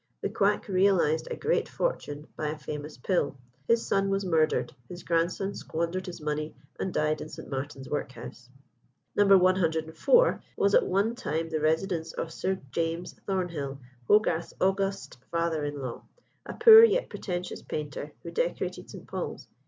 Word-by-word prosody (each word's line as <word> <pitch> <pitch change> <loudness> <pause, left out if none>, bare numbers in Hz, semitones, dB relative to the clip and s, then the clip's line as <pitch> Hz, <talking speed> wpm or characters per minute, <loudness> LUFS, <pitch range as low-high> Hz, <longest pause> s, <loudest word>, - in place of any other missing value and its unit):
The - - -1
quack - - +1
realised 185 -5 +2
a - - -3
great 455 +3 0
fortune 150 - -3
by 155 - -3
a 155 +1 -3
famous 150 0 -7
pill. 140 0 0 0.3
His 230 0 +3
son 195 0 +1
was 195 0 0
murdered; 160 -3 +1 0.2
his 175 0 -8
grandson 175 +4 0
squandered 170 +3 -3
his 175 -1 -7
money, 150 0 -3 0.2
and 190 - -2
died 155 -1 0
in 155 - -7
St. - - -10
Martin's 135 0 -5
Workhouse. 125 -3 -6 0.7
No. 205 0 +4
104 180 - +3 0.2
was 200 0 +2
at - - +5
one 200 +5 +1
time 165 -10 -3
the 160 -1 -1
residence 160 +1 0
of 165 - -4
Sir 190 0 -1
James 165 +1 -2
Thornhill, 170 -8 -2 0.3
Hogarth's 175 -6 +2
august 195 -4 0
father 170 -2 0
in 145 0 -4
law, 125 -2 -5 0.5
a - - -6
poor 450 -1 +10
yet 460 +2 +4
pretentious 180 -2 -5
painter, 150 -1 -5
who - - -6
decorated - - -2
St. - - -10
Paul's. - - -5
170 Hz, 155 wpm, -28 LUFS, 155-195 Hz, 0.7 s, poor